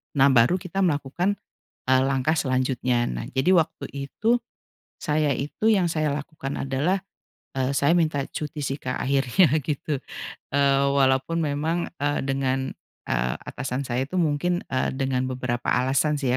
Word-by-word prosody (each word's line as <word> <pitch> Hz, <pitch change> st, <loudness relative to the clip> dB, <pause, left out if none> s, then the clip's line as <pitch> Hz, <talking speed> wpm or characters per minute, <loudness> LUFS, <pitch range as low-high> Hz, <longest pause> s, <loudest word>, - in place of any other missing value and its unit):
nah 140 Hz, 0 st, +6 dB
baru 125 Hz, +6 st, +5 dB
kita 180 Hz, +2 st, -4 dB
melakukan, 165 Hz, +4 st, 0 dB, 0.5 s
eee, 130 Hz, 0 st, +4 dB
langkah 135 Hz, +3 st, +1 dB
selanjutnya. 130 Hz, -4 st, +1 dB
Nah -, -, -4 dB
jadi 135 Hz, +7 st, +2 dB
waktu 165 Hz, -3 st, +1 dB, 0.2 s
itu 235 Hz, +3 st, +2 dB, 0.6 s
saya 150 Hz, -1 st, +1 dB
itu 150 Hz, -, 0 dB
yang 190 Hz, -5 st, +3 dB
saya 155 Hz, -2 st, 0 dB
lakukan 145 Hz, -1 st, -5 dB
adalah, 140 Hz, +8 st, 0 dB, 0.6 s
eee, 130 Hz, 0 st, +1 dB
saya 140 Hz, +4 st, +3 dB
minta 155 Hz, -4 st, +1 dB
cuti 150 Hz, 0 st, -5 dB
sih 135 Hz, 0 st, -2 dB
Kak 130 Hz, -3 st, -4 dB
akhirnya 135 Hz, +5 st, +3 dB, 0.2 s
gitu, 150 Hz, +1 st, -2 dB, 0.6 s
eee, 140 Hz, -1 st, +4 dB
walaupun 135 Hz, +3 st, +2 dB
memang, 155 Hz, +4 st, -1 dB
eee, 145 Hz, 0 st, 0 dB
dengan 135 Hz, -1 st, 0 dB, 0.5 s
eee, 60 Hz, +1 st, 0 dB
atasan 130 Hz, 0 st, -4 dB
saya 125 Hz, +1 st, -1 dB
itu 145 Hz, -, -7 dB
mungkin, 170 Hz, +3 st, +1 dB
eee, 130 Hz, -, 0 dB
dengan 130 Hz, -1 st, 0 dB
beberapa 125 Hz, -1 st, -2 dB
alasan 130 Hz, +4 st, +2 dB
sih 135 Hz, -, 0 dB
140 Hz, 145 wpm, -25 LUFS, 130-155 Hz, 0.6 s, nah